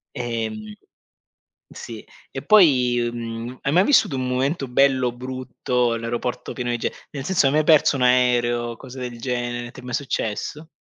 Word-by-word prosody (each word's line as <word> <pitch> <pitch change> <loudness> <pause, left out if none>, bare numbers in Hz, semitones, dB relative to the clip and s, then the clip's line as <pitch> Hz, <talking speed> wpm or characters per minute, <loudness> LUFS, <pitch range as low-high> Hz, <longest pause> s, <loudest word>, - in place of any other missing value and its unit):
Ehm, 110 -3 -4 1.0
sì, 115 -2 -9 0.3
e 135 - -5
poi, 125 - +4
mhmm, 115 +1 -6
hai 140 - -1
mai 180 +4 +5
vissuto 210 - +3
un 130 0 -2
momento 135 +3 -1
bello, 130 -1 +3
brutto, 125 -1 -2
all'aeroporto 115 +1 -4
pieno 120 -1 -3
di 120 - -1
ge - - -2 0.2
nel 135 -2 -6
senso, 170 -5 +2
hai 135 - +3
mai 155 0 +2
perso 150 -2 +5
un 130 - -2
aereo 125 -1 +3
o 115 - -8
cose 130 +1 -11
del 120 -2 -6
genere? 120 -1 -3
Ti 130 - -11
è - - -18
mai 125 - -6
successo? 140 +3 -3
125 Hz, 170 wpm, -22 LUFS, 120-135 Hz, 1.0 s, mai